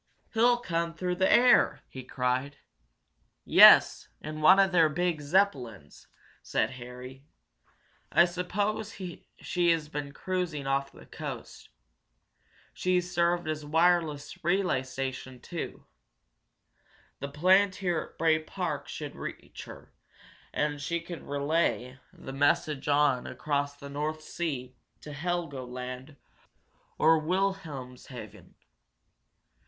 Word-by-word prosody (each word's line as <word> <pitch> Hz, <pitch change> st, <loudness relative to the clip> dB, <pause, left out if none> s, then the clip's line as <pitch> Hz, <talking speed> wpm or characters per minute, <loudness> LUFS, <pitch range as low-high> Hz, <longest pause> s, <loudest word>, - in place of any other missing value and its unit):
"He'll 240 Hz, +2 st, +4 dB
come 170 Hz, -6 st, -2 dB
through 180 Hz, +1 st, -2 dB
the 190 Hz, 0 st, +3 dB
air!" 245 Hz, +3 st, +5 dB
he 130 Hz, -, -9 dB
cried. 130 Hz, +2 st, -2 dB, 0.9 s
"Yes, -, -, +7 dB
in 155 Hz, +1 st, -7 dB
one 185 Hz, +5 st, +7 dB
of 195 Hz, -1 st, +4 dB
their 165 Hz, -3 st, +5 dB
big 170 Hz, 0 st, -1 dB
Zeppelins!" 140 Hz, -, -1 dB, 0.3 s
said -, -, -1 dB
Harry. 125 Hz, +2 st, -10 dB, 0.8 s
"I 170 Hz, -, +6 dB
suppose 200 Hz, +5 st, -2 dB, 0.4 s
she 175 Hz, -1 st, 0 dB
has 160 Hz, -3 st, +1 dB
been 145 Hz, -2 st, -5 dB
cruising 175 Hz, -3 st, -3 dB
off 140 Hz, 0 st, -1 dB
the -, -, -15 dB
coast. -, -, -8 dB, 1.0 s
She's 180 Hz, 0 st, 0 dB
served 175 Hz, -1 st, +1 dB
as 155 Hz, -1 st, -2 dB
a 145 Hz, -, -11 dB
wireless 160 Hz, -2 st, +1 dB
relay 175 Hz, -6 st, +1 dB
station, 130 Hz, -1 st, -6 dB
too. 170 Hz, +6 st, -7 dB, 1.3 s
The 140 Hz, -, -5 dB
plant 185 Hz, +6 st, +3 dB
here 175 Hz, -4 st, -1 dB
at -, -, -28 dB
Bray 160 Hz, -1 st, +3 dB
Park 160 Hz, -2 st, -4 dB
could -, -, -7 dB
reach -, -, -8 dB
her, -, -, -13 dB, 0.6 s
and 145 Hz, -1 st, -1 dB
she 170 Hz, +3 st, -1 dB
could 170 Hz, 0 st, -8 dB
relay 140 Hz, -3 st, -1 dB
the 135 Hz, -, -10 dB
message 145 Hz, +1 st, +1 dB
on 145 Hz, -3 st, +2 dB
across 145 Hz, -1 st, -2 dB
the 140 Hz, 0 st, -10 dB
North 150 Hz, +2 st, -4 dB
Sea, 135 Hz, -7 st, -4 dB, 0.3 s
to 150 Hz, -, -9 dB
Helgoland 135 Hz, -5 st, -5 dB, 0.8 s
or 160 Hz, +1 st, +5 dB
Wilhelmshaven. 140 Hz, -, -4 dB
155 Hz, 115 wpm, -29 LUFS, 135-175 Hz, 1.3 s, Yes